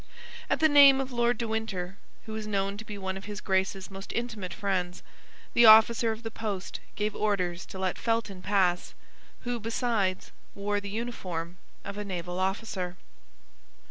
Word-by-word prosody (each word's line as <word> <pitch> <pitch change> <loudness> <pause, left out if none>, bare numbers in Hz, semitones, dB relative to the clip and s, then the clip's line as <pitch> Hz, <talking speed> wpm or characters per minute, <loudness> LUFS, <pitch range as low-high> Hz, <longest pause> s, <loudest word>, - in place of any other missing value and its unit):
At - - +1
the 315 - +7
name 280 -2 +8
of 265 0 -3
Lord 240 -1 +2
de 230 - -2
Winter, 195 -5 -3 0.3
who 220 - -7
was 215 -1 -4
known 200 -1 -1
to 220 - -7
be 210 -2 -7
one 190 -1 -3
of 195 - -9
his 205 0 -6
Grace's 190 0 -1
most 195 +1 -8
intimate 220 -6 -3
friends, 185 -4 -2 0.5
the 235 -1 +7
officer 225 +1 +7
of 220 +2 -6
the 225 - -4
post 205 -4 -4 0.2
gave 210 0 -1
orders 185 -4 -1
to - - -8
let 190 -1 -2
Felton 225 -5 -1
pass, 185 -3 +1 0.5
who, 245 -1 -3
besides, 225 -4 -1 0.2
wore 205 +1 -1
the 200 0 -7
uniform 185 -7 -4 0.3
of 200 +1 -5
a - - -2
naval 180 -2 -4
officer. 190 -2 -2
205 Hz, 170 wpm, -28 LUFS, 190-225 Hz, 0.5 s, name